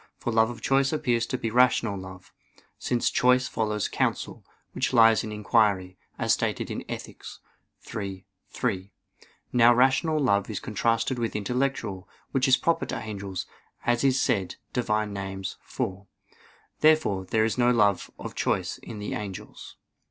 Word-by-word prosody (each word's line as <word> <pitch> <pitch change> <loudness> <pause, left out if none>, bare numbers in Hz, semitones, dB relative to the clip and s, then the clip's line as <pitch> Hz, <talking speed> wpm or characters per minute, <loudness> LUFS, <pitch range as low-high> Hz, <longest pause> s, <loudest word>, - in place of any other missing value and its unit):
For 120 - -3
love 110 0 +4
of 120 - -8
choice 135 0 +2
appears 120 -7 0
to 130 - -2
be 115 -2 -3
rational 120 -3 +3
love; 95 -1 -10 0.5
since 120 -1 0
choice 125 +1 +3
follows 105 -2 -1
counsel, - - -2 0.3
which 135 +1 -1
lies 115 -2 +6
in 110 - -5
inquiry, 105 -3 +1 0.2
as - - +2
stated - - -1
in - - -4
Ethic. - - -7 0.7
iii, 100 -2 -5 0.2
3. 100 -5 -2 0.6
Now 120 0 +6
rational 135 +5 +3
love 100 -8 +2
is 105 - -3
contrasted 115 +3 0
with 115 -2 -2
intellectual, 105 -3 -2 0.2
which 135 0 +2
is 130 - +6
proper 165 0 0
to - - -3
angels, 100 -3 -5 0.4
as 120 +1 +2
is 135 -1 +3
said 95 -7 0 0.2
(Div. 125 -3 -2
Nom. 105 -1 0 0.3
iv). - - -3 0.9
Therefore 155 -12 +3
there 110 +4 +2
is 110 +3 -2
no 120 0 +4
love 105 -5 +2
of - - -7
choice - - -1
in 115 - -9
the 105 0 -4
angels. 100 -3 -7
115 Hz, 150 wpm, -26 LUFS, 100-125 Hz, 0.9 s, lies